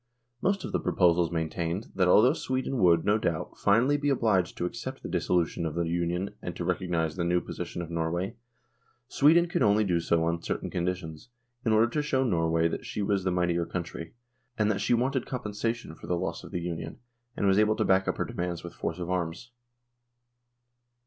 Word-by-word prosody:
Most 195 Hz, 0 st, 0 dB
of -, -, -5 dB
the -, -, 0 dB
proposals 85 Hz, -2 st, +3 dB
maintained, 85 Hz, +3 st, -2 dB
that 95 Hz, -2 st, +2 dB
al 105 Hz, +4 st, +6 dB
though 130 Hz, +3 st, +5 dB
Sweden 130 Hz, -3 st, -2 dB
would, 85 Hz, -3 st, +4 dB
no 105 Hz, +2 st, +3 dB
doubt, 85 Hz, -6 st, -2 dB
finally 120 Hz, +8 st, +3 dB
be 145 Hz, 0 st, 0 dB
obliged 110 Hz, -9 st, +1 dB
to 85 Hz, -, -1 dB
accept 125 Hz, +7 st, -6 dB
the -, -, -4 dB
dissolution 85 Hz, -1 st, 0 dB
of 80 Hz, -1 st, -3 dB
the 85 Hz, -, +1 dB
Union 85 Hz, +3 st, -1 dB
and -, -, -5 dB
to -, -, -4 dB
recog 90 Hz, -, -1 dB
nise 80 Hz, -3 st, 0 dB
the 85 Hz, -, 0 dB
new 90 Hz, +1 st, +2 dB
position 85 Hz, 0 st, -5 dB
of 85 Hz, -, -9 dB
Norway, 85 Hz, +6 st, -2 dB, 0.7 s
Sweden 160 Hz, +6 st, +5 dB
could 175 Hz, 0 st, -1 dB
only 105 Hz, +1 st, +4 dB
do 90 Hz, -4 st, +1 dB
so 85 Hz, 0 st, +1 dB
on 85 Hz, 0 st, 0 dB
certain -, -, -3 dB
conditions, 85 Hz, 0 st, -3 dB, 0.3 s
in 115 Hz, -, +1 dB
order 110 Hz, +1 st, +5 dB
to 150 Hz, +5 st, 0 dB
show 135 Hz, -3 st, +1 dB
Norway 80 Hz, -6 st, +2 dB
that -, -, -4 dB
she 105 Hz, -, -3 dB
was 100 Hz, -1 st, 0 dB
the 95 Hz, -, +1 dB
mightier 90 Hz, -1 st, +1 dB
country, 85 Hz, -1 st, -6 dB, 0.4 s
and 105 Hz, -1 st, +2 dB
that 100 Hz, -, -2 dB
she -, -, +3 dB
wanted 130 Hz, +2 st, 0 dB
compensation 115 Hz, -4 st, -3 dB
for -, -, -12 dB
the 90 Hz, -, 0 dB
loss -, -, -3 dB
of -, -, -10 dB
the 90 Hz, -, -3 dB
Union, 85 Hz, -1 st, -5 dB, 0.4 s
and -, -, 0 dB
was 95 Hz, +1 st, +4 dB
able 110 Hz, 0 st, +3 dB
to -, -, 0 dB
back 95 Hz, 0 st, +3 dB
up -, -, 0 dB
her -, -, -1 dB
demands 90 Hz, -1 st, -4 dB
with 85 Hz, -, -8 dB
force 85 Hz, -, -4 dB
of 90 Hz, 0 st, -4 dB
arms. 90 Hz, +6 st, -3 dB
90 Hz, 210 wpm, -28 LUFS, 85-110 Hz, 0.7 s, al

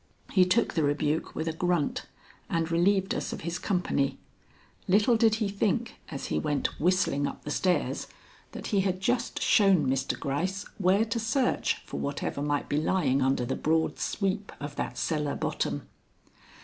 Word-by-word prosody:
He 185 Hz, -2 st, +5 dB
took 205 Hz, +6 st, +2 dB
the 160 Hz, -, +1 dB
rebuke 150 Hz, +1 st, 0 dB
with 160 Hz, -, -2 dB
a 165 Hz, -, 0 dB
grunt 175 Hz, -2 st, 0 dB, 0.4 s
and 165 Hz, 0 st, 0 dB
relieved 190 Hz, +3 st, +2 dB
us -, -, -3 dB
of -, -, -6 dB
his 170 Hz, +2 st, -3 dB
company. 180 Hz, -7 st, 0 dB, 0.7 s
Little 210 Hz, +5 st, +4 dB
did 220 Hz, -1 st, +4 dB
he 220 Hz, -2 st, 0 dB
think 210 Hz, +4 st, -1 dB
as 140 Hz, -4 st, -5 dB
he -, -, +2 dB
went 150 Hz, -2 st, -1 dB
whistling 175 Hz, -4 st, +2 dB
up -, -, -7 dB
the 150 Hz, -, -4 dB
stairs 180 Hz, +3 st, 0 dB, 0.5 s
that -, -, -7 dB
he 200 Hz, -, +4 dB
had 190 Hz, -1 st, 0 dB
just 240 Hz, +4 st, 0 dB
shown 195 Hz, -, +5 dB
Mr. 135 Hz, 0 st, 0 dB
Gryce 185 Hz, +9 st, -2 dB
where 195 Hz, +3 st, +3 dB
to 230 Hz, +1 st, -2 dB
search 245 Hz, +3 st, 0 dB
for -, -, -5 dB
whatever 140 Hz, 0 st, -3 dB
might 145 Hz, 0 st, -1 dB
be 145 Hz, -, 0 dB
lying 150 Hz, -4 st, +2 dB
under 130 Hz, -1 st, +2 dB
the -, -, -2 dB
broad 160 Hz, +1 st, 0 dB
sweep 195 Hz, 0 st, -1 dB
of 145 Hz, 0 st, -6 dB
that -, -, -3 dB
cellar 150 Hz, -3 st, -1 dB
bottom. -, -, -2 dB
180 Hz, 170 wpm, -28 LUFS, 145-200 Hz, 0.7 s, He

